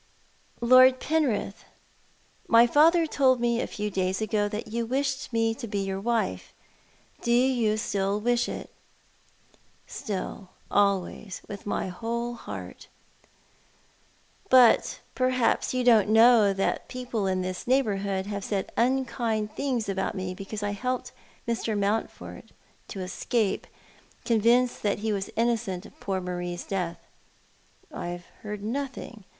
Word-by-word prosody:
" - - -34
Lord 255 0 +8
Penrith, 280 -10 -1 0.8
my 230 +1 +7
father 325 +7 +5
told 265 -4 +3
me 235 0 +1
a - - -2
few 210 0 -4
days 185 0 -1
ago 215 -1 0
that 210 +2 -4
you 230 +2 -2
wished 270 +3 -2
me 225 -1 +1
to 230 - -7
be 205 -1 -3
your 195 -1 -2
wife. 215 - -2 0.7
Do 235 - -1
you 240 -3 +3
still 200 -1 -1
wish 240 +2 +1
it? - - -7 0.6
" - - -33 0.2
"Still 200 -5 -5
— - - -33
always 200 -1 0
— - - -32
with 205 0 -8
my 190 - -1
whole 235 +5 -3
heart." 235 - -9 1.6
"But 250 -3 +5
perhaps 255 -2 +1
you 255 -1 0
don't 225 -4 +5
know 225 -2 +6
that 195 0 -1
people 250 -5 -3
in 185 -1 0
this 185 +3 -5
neighbour 250 -6 +2
hood 195 -1 -2
have 200 -1 -4
said 195 -2 -2
unkind 235 -4 0
things 255 -6 -1
about 190 0 -2
me 185 -1 -3
because 195 +3 -6
I 205 - -1
helped 250 +5 -3 0.4
Mr. 230 -2 -1
Mountford 205 +2 -3 0.3
to 195 - -6
escape 205 +3 -1 0.3
— - - -30
convinced 235 +2 +3
that 205 -1 0
he 220 - +1
was 195 -1 -3
innocent 225 -5 0
of - - -16
poor 195 -1 -2
Marie's 175 -1 -4
death." 180 -3 -4 0.9
"I - - -5
have 175 0 -6 0.2
heard 210 -1 -6
nothing. 245 -3 -5
220 Hz, 145 wpm, -27 LUFS, 195-245 Hz, 1.6 s, Lord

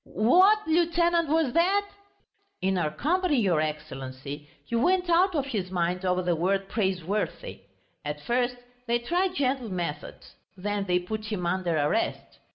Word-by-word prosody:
"Wha 350 - +5
at 425 -3 -6
lieutenant 340 0 +2
was 315 -4 +2
that?" 385 +5 +2 0.7
"In 190 +1 0
our 155 - 0
company, 305 - +1
your 180 -8 +2
Excellency, 145 -1 -6 0.2
he 235 - -4
went 360 +7 +2
out 360 +2 +4
of 285 -3 0
his 210 -9 -3
mind 180 0 -1
over 180 0 +1
the 175 -1 +1
word 195 +4 0
praiseworthy. 200 - -2 0.4
At 150 0 -4
first 245 - 0 0.3
they 235 +1 +2
tried 355 +9 -1
gentle 260 -5 0
methods, 175 -5 -5 0.2
then 205 +1 -2
they 180 -2 +2
put 215 +5 -4
him 210 -5 -3
under 175 -2 0
arrest.... 150 +10 -1
215 Hz, 155 wpm, -27 LUFS, -, 0.7 s, Wha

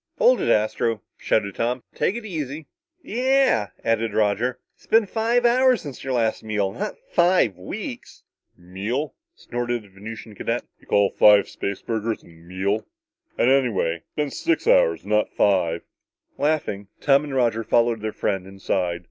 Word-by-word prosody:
"Hold - - +4
it, - - 0
Astro," 110 +1 +1
shouted 100 -2 0
Tom. 120 +4 -2
"Take 195 - 0
it 235 -2 -6
easy." 155 -5 -5 0.4
"Yeah," 260 - +2 0.2
added 115 -1 0
Roger. 110 +4 +1 0.2
"It's - - -25
been 225 -1 +4
five 230 +4 +1
hours 255 +1 +4
since 140 -5 -8
your 135 - -2
last 115 -3 0
meal 105 -3 -1
not 210 - -4 0.2
five 175 - +3
weeks!" 220 - -7 0.3
"Meal!" 100 - -4 0.2
snorted 120 - -3
the 100 - -18
Venusian 110 +3 -9
cadet. 115 +4 -2 0.2
"Call 100 -1 +3
four 105 -1 +6
spaceburgers 110 +3 -3
a - - -18
meal? 95 +5 -3 0.5
And 125 - +4
anyway, 115 -11 +2
it's 85 - -31
been 150 -2 -1
six 330 -1 0
hours, - - +3
not 105 0 +1
five." 85 -5 +1 0.6
Laughing, 145 -9 -1
Tom 140 0 +4
and 145 -2 -5
Roger 115 -3 +1
followed 115 0 +2
their 110 0 -2
friend 95 -2 -2
inside. 95 -3 -2
115 Hz, 150 wpm, -23 LUFS, 100-155 Hz, 0.6 s, four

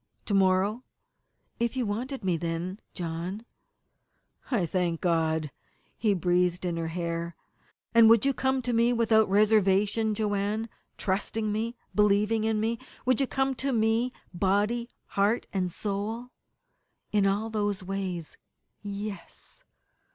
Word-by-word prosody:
"To 205 - -2
morrow?" 195 +4 +3 0.8
"If 235 +2 0
you 250 - +1
wanted 245 +6 -3
me 185 -2 +1
then, 170 +4 -3
John." 175 +5 -5 1.0
"I 215 -9 +1
thank 170 -1 -1
God," 160 -3 +1 0.4
he 210 -3 +1
breathed 180 0 +1
in 175 -1 -1
her 165 -1 -2
hair. 170 0 -3 0.6
"And 230 -1 +8
you - - +8
would 245 +4 +5
come 265 -1 0
to 245 0 -1
me 235 +1 +3
without 220 -3 +3
reservation, 210 +1 +3
Joanne, 210 +1 -1 0.3
trusting 210 +2 -1
me, 225 +3 -2 0.2
believing 210 +1 +3
in 220 -1 +1
me 225 +2 0
you 260 - -17 0.2
would 255 +1 +2
come 270 0 +1
to 275 +1 -1
me 225 +1 +2 0.2
body, 205 +6 +1
and 235 0 -8 0.2
heart, 205 +4 +1
and 185 -2 0
soul?" 215 +6 -4 0.8
"In 205 -2 +3
all 210 +3 0
those 205 -3 -1
ways 185 -4 -4 0.4
yes." 205 - -7
205 Hz, 135 wpm, -28 LUFS, 185-225 Hz, 1.0 s, And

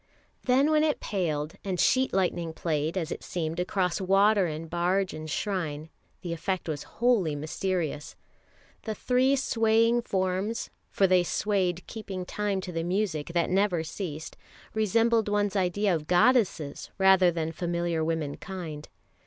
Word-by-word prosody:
Then 270 +4 +4
when 305 0 +4
it 305 -2 +1
paled, 160 -6 -2
and 185 -3 -3
sheet 260 0 +3
lightning 175 -3 0
played, 160 +1 -1
as 165 -3 -2
it - - -5
seemed, 165 -1 -3
across 180 0 0
water 195 +1 +4
and 160 +1 -5
barge 180 +3 0
and 155 0 -7
shrine, 160 -4 -3 0.3
the 170 -2 -3
effect 180 +2 -3
was 150 -3 -3 0.2
wholly 220 -11 +2
mysterious. 155 0 -3 0.7
The 220 -2 -3
three 255 +5 +2
swaying 230 -2 +2
forms 190 +1 -2 0.2
for 195 - +2
they 185 -1 +4
swayed 185 -1 0
keeping 195 -5 -6
time 205 0 -2
to 185 - -6
the 165 -1 -2
music 175 -4 -1
that 170 +1 +1
never 185 -3 +2
ceased 160 -2 -6 0.4
resembled 225 +1 +2
one's 205 -1 0
idea 195 +1 +1
of 150 -2 -5
goddesses 180 - +2
rather 190 -2 +6
than 165 -1 -2
familiar 170 -1 -1
womenkind. 160 0 -4
185 Hz, 145 wpm, -28 LUFS, 165-210 Hz, 0.7 s, rather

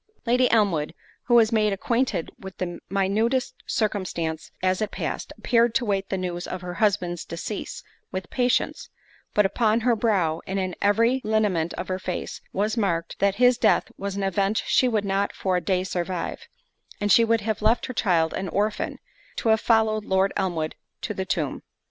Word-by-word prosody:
Lady 250 +1 +3
Elmwood, 180 -8 +2 0.3
who 240 - +3
was 225 -2 +6
made 215 -2 +3
acquainted 215 -2 -1
with 190 0 -9
the 175 -1 -4
minutest 215 +6 +1
circumstance 185 -8 -2
as 185 +1 +1
it 215 - 0
passed, - - -4
appeared 235 -1 +2
to 260 - +2
wait 195 -2 -1
the 190 - -1
news 175 -1 -4
of 185 - -5
her 180 -1 -5
husband's 175 -3 0
decease 170 +5 -6 0.3
with 185 -2 -5
patience; 250 -1 0 0.5
but 210 - +5
upon 220 +3 +2
her 240 0 +3
brow, 190 -8 +1
and 190 - -2
in 185 -2 -2
every 230 +6 +3
lineament 205 -7 +1
of 180 - -5
her 185 0 -2
face 185 -1 -5
was 210 +3 0
marked, 170 -7 -1
that 200 0 +2
his 250 -1 +4
death 220 - +3
was 200 0 -4
an 200 - -2
event 195 +2 +1
she 255 - +3
would 215 -4 0
not 195 +1 0
for 185 -1 0
a - - -1
day 185 +2 0
survive: 180 -1 -3 0.5
and 205 0 +1
she 230 - +7
would 230 -1 +2
have 215 0 -2
left 220 +3 +2
her 255 - -5
child 170 -8 +2
an 190 -1 -3
orphan, 210 +3 -1 0.4
to 225 - -1
have 220 0 +4
followed 220 -2 +2
Lord 190 0 +1
Elmwood 160 -4 -1 0.3
to 210 - -3
the 190 -1 -3
tomb. 155 -7 -2
200 Hz, 185 wpm, -25 LUFS, 185-220 Hz, 0.5 s, she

